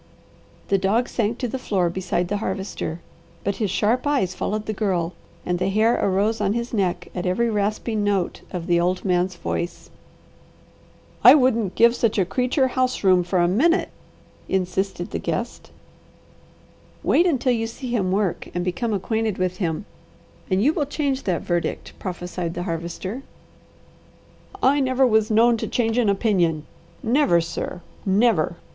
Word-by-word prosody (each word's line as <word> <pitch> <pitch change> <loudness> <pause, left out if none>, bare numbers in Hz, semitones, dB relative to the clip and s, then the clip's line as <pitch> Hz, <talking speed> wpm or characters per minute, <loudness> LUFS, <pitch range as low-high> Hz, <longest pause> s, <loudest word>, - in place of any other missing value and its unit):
The 195 - +3
dog 215 +6 +1
sank 225 0 -1
to 250 - -2
the 260 +3 -4
floor 190 -7 0
beside 180 0 -1
the 205 +3 -1
Harvester, 190 -4 -4 0.4
but 200 - -1
his 210 -3 -1
sharp 230 +8 +1
eyes 260 -11 +1
followed 210 +3 -3
the 215 - -2
Girl, 185 -5 -1 0.3
and 180 0 -1
the 185 +1 +1
hair 215 +4 +3
arose 205 +3 +1
on 200 0 +1
his 235 +1 -3
neck 190 -5 -1
at 180 0 -3
every 230 +6 +1
rasping 210 +1 -1
note 200 -3 0
of 175 -2 -5
the 175 -1 +2
old 180 +2 0
man's 180 0 +1
voice. 170 0 -4 1.3
"I - - +10
wouldn't 235 -8 +2
give 235 +1 +5
such 230 -3 +1
a 190 - +3
creature 255 - +1
house 255 -1 -1
room 185 -2 +5
for 180 +2 -1
a 175 -1 +4
minute," 320 - +2 0.6
insisted 190 -1 -1
the - - -2
guest. - - -4 1.3
"Wait 350 - +4
until 265 -6 +1
you 225 -1 -1
see 245 +2 -7
him 190 -5 0
work 195 -2 -1
and 175 0 -1
become 215 +5 -1
acquainted 220 +1 -1
with 185 0 -1
him, 175 +1 -2 0.6
and 190 +1 +2
you 295 +5 +4
will 295 -4 -1
change 275 -2 -2
that 180 -4 -1
verdict," 175 -1 -2
prophesied 175 -2 -4
the 175 - -3
Harvester. 175 +6 -4 1.4
"I 280 +2 +4
never 260 -1 +3
was 220 -3 +3
known 230 +2 +4
to - - -3
change 230 0 0
an 225 -4 +3
opinion. 180 -7 +1 0.4
Never, 230 - +3
sir! 170 +1 -4 0.2
Never!" 200 -4 +2
200 Hz, 160 wpm, -23 LUFS, 180-235 Hz, 1.4 s, I